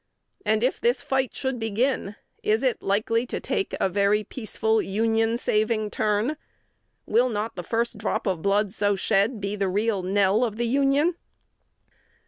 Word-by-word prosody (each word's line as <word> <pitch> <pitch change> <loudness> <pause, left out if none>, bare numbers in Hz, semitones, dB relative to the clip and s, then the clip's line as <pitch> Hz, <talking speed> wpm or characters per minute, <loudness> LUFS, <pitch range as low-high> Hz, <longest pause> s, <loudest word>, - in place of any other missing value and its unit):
And, 220 -5 +1
if 255 - 0
this 245 +1 +1
fight 265 -2 -1
should 265 -2 -2
begin, 225 -1 -1 0.3
is 215 +4 +1
it 255 -2 +1
likely 230 +4 0
to - - -3
take 390 - -2
a - - +2
very 200 +2 +2
peaceful, 220 -1 -1
Union 225 +3 +1
saving 215 -1 0
turn? 215 +8 0 0.7
Will 240 +4 +3
not 215 0 -3
the 180 - -4
first 230 +4 -2
drop 210 - -2
of 185 -5 -1
blood 200 +1 +1
so 205 -2 +1
shed 200 +4 +1
be 200 +1 -3
the 195 -2 0
real 205 +1 0
knell 195 +4 +2
of 220 -3 -2
the 240 - 0
Union?" 280 +7 +2
220 Hz, 160 wpm, -25 LUFS, 205-240 Hz, 0.7 s, Will